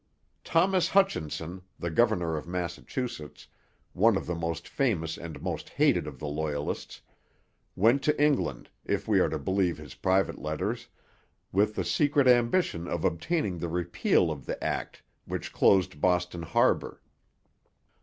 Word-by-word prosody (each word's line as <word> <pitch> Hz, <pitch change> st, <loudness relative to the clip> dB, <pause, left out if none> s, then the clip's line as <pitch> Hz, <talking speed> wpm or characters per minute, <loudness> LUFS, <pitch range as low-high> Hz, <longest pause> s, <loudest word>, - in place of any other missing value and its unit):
Thomas 185 Hz, +2 st, +2 dB
Hutchinson, 90 Hz, -, 0 dB, 0.2 s
the 85 Hz, -, -3 dB
governor 85 Hz, -4 st, +2 dB
of 75 Hz, -, -5 dB
Massachusetts, 90 Hz, -, -5 dB, 0.5 s
one 110 Hz, +2 st, +4 dB
of -, -, -4 dB
the 90 Hz, -, -2 dB
most 85 Hz, -1 st, -3 dB
famous 85 Hz, -12 st, 0 dB
and 80 Hz, -2 st, -8 dB
most -, -, -4 dB
hated -, -, +2 dB
of -, -, -7 dB
the 75 Hz, -, -6 dB
Loyalists, 75 Hz, -1 st, -3 dB, 0.7 s
went 115 Hz, +8 st, +4 dB
to 150 Hz, 0 st, +1 dB
England, 140 Hz, -, +1 dB
if -, -, -2 dB
we 105 Hz, -3 st, +4 dB
are 85 Hz, -, +3 dB
to 80 Hz, -, -2 dB
believe 90 Hz, +4 st, 0 dB
his 75 Hz, -3 st, -10 dB
private 95 Hz, +1 st, +1 dB
letters, 100 Hz, +11 st, -3 dB, 0.6 s
with 105 Hz, +3 st, +2 dB
the 95 Hz, -, -1 dB
secret 140 Hz, -, +2 dB
ambition 120 Hz, -, +3 dB
of 85 Hz, -2 st, -2 dB
obtaining 95 Hz, -, -1 dB
the 85 Hz, -, -3 dB
repeal 85 Hz, 0 st, +1 dB
of -, -, -7 dB
the -, -, -2 dB
act -, -, -3 dB, 0.2 s
which -, -, -5 dB
closed 95 Hz, -5 st, +3 dB
Boston 90 Hz, -1 st, +1 dB
harbour. 80 Hz, -, +1 dB
90 Hz, 145 wpm, -28 LUFS, 80-120 Hz, 0.7 s, one